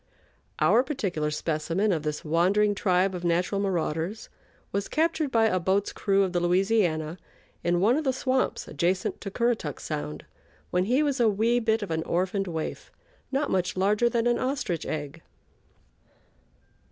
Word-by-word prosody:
Our 235 - +4
particular 195 - -2
specimen 165 +6 -1
of 165 -4 0
this 150 +1 -4
wandering 190 +7 +3
tribe 190 -1 +1
of 180 -1 -5
natural 180 +3 +1
marauders 180 +1 -2 0.4
was 200 0 -2
captured 320 -1 0
by 225 -3 +3
a 185 -4 +2
boat's 190 +3 0
crew 195 -1 +2
of 185 -2 -2
the 175 - +2
Louisiana 175 -3 +1 0.4
in 175 0 +2
one 215 +7 +4
of 310 - -1
the 265 - +2
swamps 260 0 -1
adjacent 175 +5 -1
to 200 - -4
Currituck 225 - -1
Sound 145 - -5 0.5
when 180 +1 +1
he 255 +8 +2
was 280 -3 0
a 235 -2 +5
wee 225 +4 +2
bit 225 -1 +1
of 200 - -6
an 160 0 0
orphaned 185 +4 -1
waif, 160 -2 -5 0.4
not 275 +2 0
much 185 0 0
larger 210 +5 +3
than 235 0 0
an 240 0 +2
ostrich 255 - -2
egg. 150 +1 -5
195 Hz, 160 wpm, -27 LUFS, 170-225 Hz, 0.5 s, a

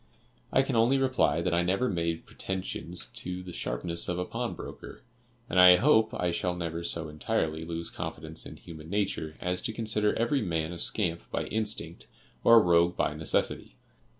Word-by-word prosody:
I 135 - +4
can 135 -2 -2
only 120 +4 +4
reply 130 -10 +2
that 90 - 0
I 85 - +3
never 95 +8 +1
made 85 -5 -2
pretensions 90 -2 -5
to 90 0 -5
the 90 -1 -8
sharpness 85 +8 -2
of 90 - -1
a 90 - -1
pawn - - -3
broker, - - -9 0.4
and 90 - +1
I 90 0 +10
hope 110 0 +4
I 90 -1 0
shall 90 +1 -1
never 85 -1 -4
so 85 -1 -3
entirely 80 +1 -2
lose 85 0 -5
confidence 80 -2 -6
in - - -10
human 80 -1 -11
nature 95 -6 -1
as 90 0 -1
to 115 - -2
consider 110 -1 0
every 120 +4 +1
man 80 -4 -1
a 85 - -6
scamp 85 -3 0
by - - -2
instinct, 105 -7 -3 0.4
or 115 - +8
a - - +10
rogue 85 0 +3
by - - +1
necessity. - - -1
90 Hz, 180 wpm, -29 LUFS, 85-105 Hz, 0.4 s, I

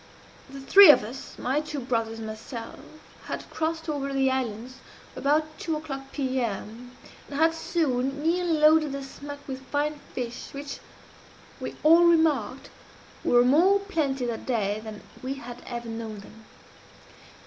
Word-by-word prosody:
"The 275 0 -9
three 390 +8 +9
of 295 - +8
us 240 +5 -9
my 265 +4 0
two 300 -1 -5
brothers 230 -3 -2
and 225 - -6
myself 225 +2 -7 0.5
had - - -5
crossed 320 +1 -2
over 290 -3 -2
to 275 - -4
the 265 -1 +3
islands 255 0 -3 0.4
about 305 +2 0
two 320 -2 -2
o'clock 275 -3 -7
P.M., 245 -2 -3 0.3
and 320 +3 +2
soon 280 -4 -1
nearly 345 +2 +1
loaded 305 -1 +4
the 275 0 -4
smack 285 +1 -9
with 265 -1 -5
fine 295 +1 -1 0.2
fish, 245 +2 -5
which, 280 0 -6 0.8
we - - -6
all 330 +3 +7
remarked, 310 -7 +2 0.5
were 245 0 +4
more 340 +10 +5
plenty 300 -10 -1
that 235 -2 -4
day 215 -4 0
than 215 -1 -8 0.2
we 265 +2 -3
had 245 -2 -9
ever 240 -1 -5
known 225 -1 -6
them. 220 +2 -15
270 Hz, 150 wpm, -26 LUFS, 240-305 Hz, 0.8 s, three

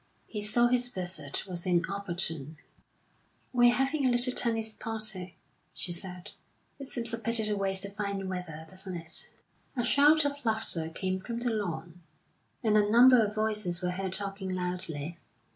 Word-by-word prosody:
He 210 - -5
saw 215 +3 +6
his 245 0 +3
visit 175 - -3
was 180 -3 -2
inopportune. 175 -4 -2 1.0
"We're 240 -1 +6
having 275 +2 0
a 260 - +3
little 245 +1 +3
tennis 225 -3 +3
party," 215 -6 -3 0.4
she 175 - 0
said, 180 0 -4 0.5
"It 275 - -7
seems 235 -3 -2
a 230 - -2
pity 230 0 +3
to 210 0 +1
waste 195 -1 -2
the 200 - -6
fine 200 -2 -4
weather, 175 -4 -6
doesn't 185 +1 -8
it?" 165 -1 -5 0.5
A 240 - +1
shout 295 +4 +5
of 285 -1 -3
laughter 220 -8 -1
came 185 +2 -3
from 230 +4 -5
the 240 -1 0
lawn, 175 -5 -4 0.6
and 215 -2 +2
a 210 -1 +3
number 245 +1 +7
of 210 0 -3
voices 210 -5 -1
were 180 - 0
heard 190 0 -4
talking 195 -1 -2
loudly. 180 -3 -3
200 Hz, 160 wpm, -29 LUFS, 180-230 Hz, 1.0 s, number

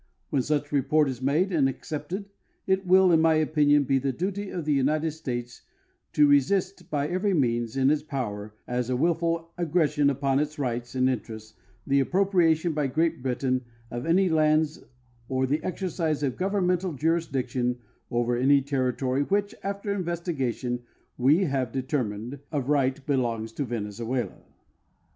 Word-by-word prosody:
When 135 - +2
such 145 +1 -1
rejxjrt 150 +2 +3
is 130 -3 -5
madean.l 150 +2 +2
accepted 160 +8 -5 0.4
it 190 0 0
will, 185 0 +6
in 160 -1 +5
my 160 -1 +4
opinion, 150 -2 +3
be 135 0 +2
the 135 +1 -1
duty 195 +7 -3
of 170 -4 -4
the 150 - +2
United 155 +4 +1
States 125 -6 -5 0.5
to 150 -1 +5
resist 175 +5 +2
by 145 -2 0
every 185 +3 0
means 120 -4 0
in 135 +1 +4
its 155 - +1
power 105 -8 -5
as 125 0 -2
a 130 - +1
willful 165 +3 0
aggression 155 -4 +2
upon 140 0 +1
its 150 +1 -2
rights 120 -3 -3
and 130 0 +3
interests 110 -3 -4 0.3
the 140 0 +3
appropriation 175 0 +2
by 150 -2 0
Great 160 +3 0
Britain 130 0 -1 0.3
of 120 +6 -4
any 185 +3 +4
lands 155 -1 +2 0.5
or 130 0 +1
the 145 +4 -1
exercise 170 -5 -2
of 130 -3 0
governmental 185 -2 0
jurisdiction 130 -6 0 0.3
over 120 0 0
any 135 +3 +4
territory 130 -1 0
which, 200 +6 0
aaer 200 +1 -2
investigation, 160 -9 -2 0.3
we 145 +9 +4
have 135 -7 -1
determined 130 -2 -3
of 140 -3 -2
right 135 -1 +1
belongs 115 -6 -1
to 140 +5 -3
Venezuela. 115 +2 -3
145 Hz, 150 wpm, -26 LUFS, 130-165 Hz, 0.5 s, will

